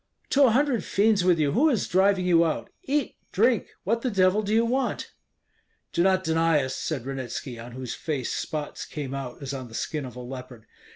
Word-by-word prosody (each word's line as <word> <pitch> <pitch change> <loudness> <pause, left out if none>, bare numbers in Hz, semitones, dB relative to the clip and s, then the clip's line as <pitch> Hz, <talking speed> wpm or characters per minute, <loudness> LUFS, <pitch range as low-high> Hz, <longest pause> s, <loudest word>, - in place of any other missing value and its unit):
"To 280 0 +6
a - - +5
hundred 255 0 +2
fiends 205 -1 +2
with 180 -2 +4
you, 150 -3 +2
who 285 - +4
is 240 -9 0
driving 190 0 +3
you 170 -2 +5
out? 160 -2 -2
Eat, 285 -1 -1
drink! 230 +2 +2 0.2
What 230 +4 0
the 255 - 0
devil 190 0 +3
do 210 0 -3
you 225 +1 +4
want?" 260 +3 -1 0.8
"Do 170 - +2
not 185 +1 +3
deny 160 -3 +2
us," 130 0 -3
said 140 -7 -3
Ranitski, 130 -2 -5
on 120 +1 -9
whose 125 -1 -5
face 145 -6 -3
spots 150 -2 -4
came 140 -3 -5
out 135 0 -6
as 135 0 -4
on 130 -2 -5
the 115 - -11
skin 150 +1 -3
of 125 -2 -9
a - - -8
leopard. 125 -2 -9
165 Hz, 210 wpm, -26 LUFS, 135-215 Hz, 0.8 s, To